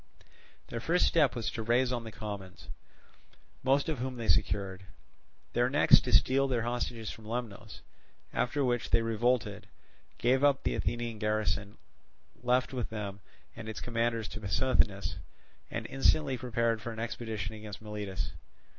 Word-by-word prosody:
Their 115 - -3
first 170 +10 +3
step 155 -5 +3
was 115 -2 -2
to 115 - -4
rise 120 +3 +2
on 120 -2 -2
the 110 - -6
commons, 100 -4 -7 0.9
most 135 +2 +3
of 155 -6 -2
whom 130 +1 -3
they 115 -2 -4
secured; 95 -2 +1 0.7
their - - +3
next - - +7
to - - -3
steal 135 +1 +4
their 120 -4 0
hostages 120 -2 -2
from 110 - -11
Lemnos; 115 -3 -5 0.5
after 140 +3 +1
which 120 -1 0
they 115 - +3
revolted, 115 +2 0 0.5
gave 130 +3 +3
up 140 -2 +4
the - - +1
Athenian 120 -2 -2
garrison 105 -1 0 0.6
left 125 +2 +2
with 125 -3 -2
them 105 -2 -5 0.4
and 115 -1 -7
its 110 - -5
commanders 115 -1 -1
to 110 - -7
Pissuthnes, 100 0 +1 0.5
and - - -4
instantly 135 +1 +2
prepared 115 -2 0
for 120 - -4
an 110 - -8
expedition 115 -3 -3
against 105 -2 -8
Miletus. 105 -3 -4
115 Hz, 150 wpm, -31 LUFS, 110-125 Hz, 0.9 s, next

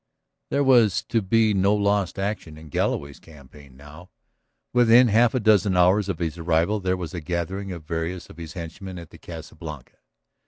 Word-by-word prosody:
There 140 - +1
was 115 -8 +4
to 115 - +1
be 110 +2 +2
no 100 +1 +2
lost 100 -2 0
action 95 -6 -4
in 80 0 -13
Galloway's 70 0 -2
campaign 70 -3 -16
now. 75 +5 -14 0.6
Within 120 0 +6
half 115 +3 +3
a - - +2
dozen 105 -4 +3
hours 95 +3 +3
of 95 - -2
his 85 -1 -4
arrival 85 +5 +1
there 95 -1 -1
was 85 -4 -6
a 90 - -5
gathering 90 +4 -4
of 85 -3 -7
various 85 +3 -4
of - - -15
his 85 -1 -8
henchmen 90 +2 -8
at 85 -2 -11
the - - -14
Casa 80 -1 -10
Blanca. 75 -6 -10
90 Hz, 185 wpm, -24 LUFS, 80-105 Hz, 0.6 s, Within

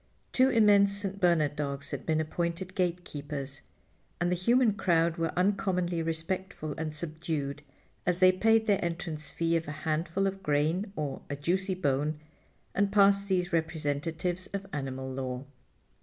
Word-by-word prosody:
Two 260 +1 +5
immense 205 -4 +5
St. 200 0 -4
Bernard 165 -5 +3
dogs 140 -2 -3
had - - -5
been 160 -1 +2
appointed 170 +3 -2
gatekeepers, 150 -6 -3 0.6
and 175 +1 +1
the - - +3
human 235 +5 +3
crowd 170 -4 +2
were 165 -1 0
uncommonly 180 -3 +1
respectful 165 0 -3
and 155 -1 -4
subdued 155 -3 -3 0.4
as 180 -1 +1
they 185 0 +7
paid 225 +4 +3
their 200 -4 +2
entrance 165 -3 -4
fee 165 0 0
of 165 -2 -1
a - - -3
handful 165 +5 0
of 195 0 -2
grain 160 +6 +1
or 145 -3 -3
a 145 - -2
juicy 185 +6 0
bone 150 -2 0 0.5
and 200 0 +1
passed 200 -1 +5
these 180 -2 0
representatives 160 +2 -1
of 195 0 -4
animal 130 -2 -3
law. 130 0 -4
170 Hz, 150 wpm, -30 LUFS, 150-190 Hz, 0.6 s, they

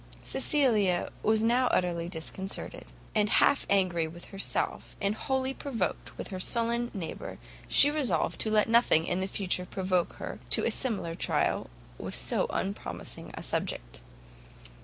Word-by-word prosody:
Cecilia 215 - +3
was 220 0 +2
now 245 +3 +3
utterly 170 -4 0
disconcerted; 190 +3 -5 0.3
and 210 -1 +2
half 280 - +3
angry 180 -5 +2
with 170 +2 -10
herself, 195 0 -2
and 200 0 +1
wholly 265 +3 -1
provoked 240 -10 -3
with - - -6
her 185 - -5
sullen 235 +4 +2
neighbour, 170 -6 -6 0.3
she 285 - +6
resolved 255 - 0
to 220 - -1
let 215 -1 +3
nothing 225 -8 +4
in 190 +1 -1
future 185 -2 0
provoke 185 -2 -1
her - - -7
to - - +3
a - - +1
similar 210 -10 -1
trial 165 - 0 0.3
with - - -5
so - - +1
unpromising 195 +2 -4
a - - -7
subject. - - -3
200 Hz, 140 wpm, -29 LUFS, 180-235 Hz, 0.3 s, she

